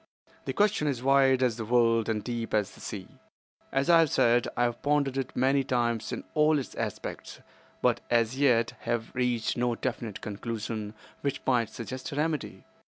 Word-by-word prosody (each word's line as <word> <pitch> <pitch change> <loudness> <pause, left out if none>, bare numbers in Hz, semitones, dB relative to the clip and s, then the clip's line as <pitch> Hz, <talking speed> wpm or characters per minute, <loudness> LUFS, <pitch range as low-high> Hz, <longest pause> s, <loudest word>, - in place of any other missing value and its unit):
The - - -2
question 205 -7 +2
is 130 -4 -2
wide 135 -1 +4
as 120 -3 +1
the 110 - -4
world 115 -1 +3
and 110 -2 -1
deep 115 -2 -3
as 105 -2 +1
the - - -16
sea. - - -8 0.5
As 135 +2 +1
I 170 -1 +7
have 165 -2 +4
said, 120 -1 +3
I 120 - +3
have 120 -1 -1
pondered 145 -2 +1
it 135 -1 -3
many 135 +2 +3
times 120 -4 0
in - - -4
all 155 0 +4
its 135 - -4
aspects, - - -5 0.4
but - - +3
as 115 +1 +2
yet 120 -5 +3
have 115 -1 -3
reached 125 -3 0
no 120 -1 +1
definite 115 -4 -4
conclusion 110 0 -5 0.3
which 140 -1 -1
might 120 -4 +2
suggest 125 +3 -6
a - - -5
remedy. 155 -1 -2
120 Hz, 180 wpm, -28 LUFS, 115-135 Hz, 0.5 s, I